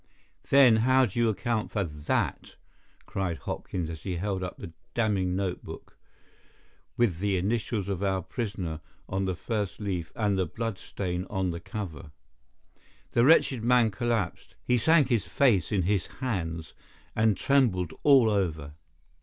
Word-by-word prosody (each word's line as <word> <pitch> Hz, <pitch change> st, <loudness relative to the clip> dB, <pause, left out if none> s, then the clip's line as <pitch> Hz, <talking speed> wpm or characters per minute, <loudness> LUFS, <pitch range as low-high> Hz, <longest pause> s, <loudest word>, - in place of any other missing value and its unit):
"Then 130 Hz, -5 st, +7 dB
how 130 Hz, +3 st, +4 dB
do 115 Hz, +1 st, -4 dB
you 115 Hz, -1 st, +3 dB
account 110 Hz, +1 st, -1 dB
for 100 Hz, -, -1 dB
that?" 75 Hz, -3 st, -2 dB, 0.5 s
cried 90 Hz, -4 st, -2 dB
Hopkins, 85 Hz, +1 st, -4 dB
as 80 Hz, -1 st, -7 dB
he 95 Hz, -2 st, -3 dB
held 95 Hz, +1 st, -2 dB
up 90 Hz, -1 st, -5 dB
the 85 Hz, -, -9 dB, 0.2 s
damning 100 Hz, -6 st, +1 dB
notebook, 95 Hz, -2 st, -5 dB, 1.0 s
with 110 Hz, -9 st, +2 dB
the 100 Hz, -1 st, +1 dB
initials 105 Hz, +1 st, -1 dB
of 100 Hz, -2 st, -3 dB
our 95 Hz, -2 st, 0 dB
prisoner 95 Hz, -, -4 dB, 0.3 s
on 95 Hz, +1 st, -1 dB
the 95 Hz, -1 st, -1 dB
first 105 Hz, -1 st, -3 dB
leaf 95 Hz, -6 st, -3 dB
and 105 Hz, -3 st, +1 dB
the 90 Hz, -, +1 dB
blood 115 Hz, +3 st, -4 dB
stain 90 Hz, -1 st, -4 dB
on 95 Hz, -3 st, -1 dB
the 85 Hz, -, -5 dB
cover. 85 Hz, -8 st, -7 dB, 1.0 s
The 120 Hz, -, +3 dB
wretched 135 Hz, -5 st, +4 dB
man 120 Hz, -2 st, +4 dB
collapsed. 110 Hz, -3 st, -2 dB
He 125 Hz, -1 st, +2 dB
sank 155 Hz, 0 st, +4 dB
his 115 Hz, -5 st, +1 dB
face 105 Hz, -, +2 dB
in 100 Hz, -4 st, +1 dB
his 95 Hz, 0 st, 0 dB
hands, 85 Hz, -10 st, -4 dB, 0.4 s
and 110 Hz, -3 st, +3 dB
trembled 100 Hz, -, +2 dB
all 135 Hz, -5 st, +6 dB
over. 80 Hz, -9 st, -1 dB
100 Hz, 150 wpm, -28 LUFS, 90-115 Hz, 1.0 s, Then